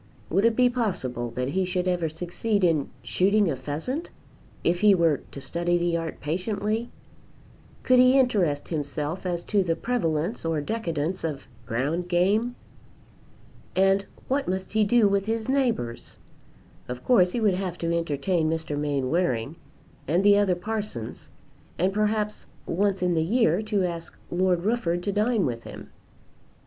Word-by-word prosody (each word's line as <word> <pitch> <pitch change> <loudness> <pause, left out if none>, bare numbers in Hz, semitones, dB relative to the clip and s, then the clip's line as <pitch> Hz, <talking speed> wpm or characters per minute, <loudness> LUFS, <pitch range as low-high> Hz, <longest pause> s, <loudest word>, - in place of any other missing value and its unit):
Would 195 +6 +3
it 230 -1 +4
be 250 +1 +5
possible 175 - -2
that 125 +1 -1
he 190 +6 0
should 180 0 -1
ever 175 -3 0
succeed 180 +6 -2
in 160 -5 +2
shooting 200 -1 +2
a - - -1
pheasant, 155 - -4 0.5
if 175 +1 +2
he 205 0 +6
were 165 -5 +2
to - - -7
study 170 +6 0
the 175 -1 0
art 165 -1 -3
patiently? 205 +8 -2 0.9
Could 255 -1 +5
he 255 +2 +6
interest 195 - +1
himself 150 +3 -3
as 175 -1 -2
to 205 -2 +1
the 170 -3 0
prevalence 180 -4 -1
or 165 -2 0
decadence 170 -2 -2
of 150 -4 -3 0.2
ground 145 +9 -1
game? 205 +8 +2 1.2
And 195 +1 +3 0.2
what 275 +1 0
must 190 +1 -3
he 215 0 +4
do 225 0 +4
with 200 0 0
his 225 0 -1
neighbours? 240 - -1 0.7
Of 125 0 -6
course 180 -8 +4
he 240 - 0
would 210 -4 +3
have 180 -1 -3
to 170 0 -1
entertain 165 +1 0
Mr. 160 -2 -2
Mainwaring 140 -3 0 0.5
and 170 +7 +2
the 205 0 +7
other 200 -3 +3
parsons, 205 - -5 0.5
and 185 +2 +1
perhaps 210 0 -1 0.2
once 195 +1 0
in 180 -1 +2
the 160 - +2
year 190 0 +2
to 210 -3 0
ask 170 -2 -4
Lord 180 -1 +1
Rufford 180 -7 0
to 200 - -1
dine 210 0 +1
with 115 -2 -2
him. - - -10
180 Hz, 155 wpm, -26 LUFS, 160-210 Hz, 1.2 s, the